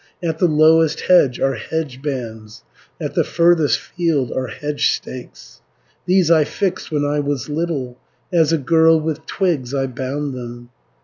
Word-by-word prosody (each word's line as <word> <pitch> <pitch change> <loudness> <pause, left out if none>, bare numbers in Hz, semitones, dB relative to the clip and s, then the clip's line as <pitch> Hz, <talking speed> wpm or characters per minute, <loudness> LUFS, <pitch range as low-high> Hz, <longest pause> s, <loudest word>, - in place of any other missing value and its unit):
At 160 -1 -2
the 180 - +4
lowest 160 0 +4
hedge 140 -9 +4
are 135 0 +1
hedge 135 +2 -4
bands, 115 -7 -6 0.4
At - - -4
the - - +2
furthest 170 -3 +3
field 160 -8 -1
are 130 0 -2
hedge 150 0 -1
stakes, 130 -1 -9 0.5
410 180 - +3
These 180 -4 +3
I 160 -2 +5
fixed 185 +3 -3
when 145 -1 0
I 145 +1 0
was 145 -2 -2
little, 145 -6 -3 0.3
As 165 -2 +3
a 165 - +3
girl 160 +2 +4
with 155 0 -4
twigs 145 -9 -1
I 135 -1 0
bound 135 +2 -4
them. 120 -1 -8
150 Hz, 165 wpm, -19 LUFS, 130-165 Hz, 0.5 s, I